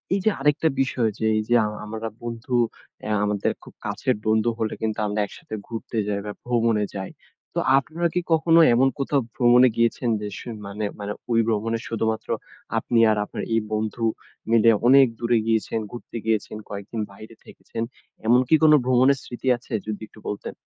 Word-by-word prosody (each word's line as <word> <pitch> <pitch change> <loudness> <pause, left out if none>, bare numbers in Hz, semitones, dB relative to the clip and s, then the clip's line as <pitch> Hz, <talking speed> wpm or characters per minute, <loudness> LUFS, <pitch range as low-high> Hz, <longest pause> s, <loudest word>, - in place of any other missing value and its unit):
এইযে 200 +2 +2
আরেকটা 150 +3 +2
বিষয় 125 -4 +1
যে, 110 - -1
এইযে 110 +3 +1
আ - - 0 0.2
আমরা 110 +1 -5 0.2
বন্ধু 120 +2 -4 0.5
এয়া 105 0 0
আমাদের 105 -1 0
খুব - - -13
কাছের - - 0
বন্ধু 110 +2 +3
হলে 110 -1 -1
কিন্তু 110 -1 -1
আমরা 105 +1 -2
একসাথে 105 - -9
ঘুরতে 115 0 -6
যাই 100 -1 -1
বা, 105 - -4
ভ্রমণে 115 -3 +2
যাই। 95 -1 -5 0.4
তো - - +1 0.2
আপনারা 165 +5 0
কি 180 - +1
কখনো 165 +1 +5
এমন 130 +3 +4
কোথাও 140 0 +1
ভ্রমণে 125 +1 +6
গিয়েছেন? 115 +1 +1
যে 105 - -3
স - - -8 0.2
মানে 105 +2 -4
মানে 100 0 -4 0.2
ওই 115 - +4
ভ্রমণে 115 +1 0
শুধুমাত্র 110 -1 -2 0.5
আপনি 120 -2 +1
আর 105 - +1
আপনার - - -6
এই 115 - +4
বন্ধু 110 +2 -2 0.5
মিলে 115 0 +6 0.2
অনেক 135 0 +7
দূরে 120 0 +2
গিয়েছেন, 115 0 0
ঘুরতে 120 -1 -8
গিয়েছেন, 110 -1 -1
কয়েকদিন 100 +2 -5
বাইরে 110 +3 -12
থেকেছেন? 115 0 -6 0.4
এমন 120 +2 +6
কি 160 - +5
কোন 155 - +7
ভ্রমণের 130 +2 +4
স্মৃতি 120 +1 -7
আছে? 120 - -12
যদি 105 -1 -4
একটু 110 - -17
বলতেন? 105 - -4
115 Hz, 175 wpm, -24 LUFS, 110-125 Hz, 0.5 s, অনেক